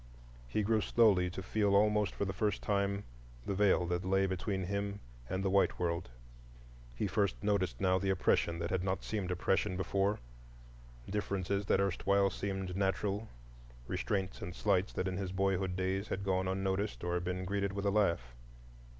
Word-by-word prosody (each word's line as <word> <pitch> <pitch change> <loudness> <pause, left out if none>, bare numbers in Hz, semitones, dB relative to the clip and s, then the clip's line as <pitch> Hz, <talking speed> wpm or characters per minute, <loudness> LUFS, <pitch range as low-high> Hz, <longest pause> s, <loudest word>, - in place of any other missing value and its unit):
He 105 - 0
grew 110 +1 +2
slowly 100 -7 +4
to 95 +1 -6
feel 100 +1 +2
almost 105 0 +3
for 100 - -1
the 95 - -2
first 105 +2 -1
time 100 0 0 0.4
the - - -1
Veil 95 -2 +3
that 90 +2 -1
lay 95 +1 +2
between 95 +1 -2
him 100 +2 -2 0.3
and 95 +1 -1
the - - +3
white 100 0 +3
world; 85 -3 -1 0.9
he - - -1
first 100 0 +1
noticed 100 -3 0
now 95 -1 +3
the 95 - -1
oppression 85 -2 +2
that 85 0 -3
had 95 -1 0
not 95 0 -1
seemed 100 -4 -2
oppression 90 +1 +1
before, 100 +2 +1 0.9
differences 100 -1 -1
that - - +3
erstwhile 100 +1 +2
seemed 95 -1 -3
natural, 100 +2 0 0.6
restraints 95 -3 -2
and 90 - -6
slights 100 -1 +1
that 95 - -2
in 95 -1 -2
his 95 -2 -3
boyhood 95 -1 0
days 95 +2 -1
had 100 - -3
gone 95 -1 +1
unnoticed 95 +2 -1
or 90 0 0
been 90 +1 -3
greeted 100 +1 -1
with 100 +1 -4
a 100 - +3
laugh. 85 - +1
95 Hz, 170 wpm, -33 LUFS, 95-100 Hz, 0.9 s, slowly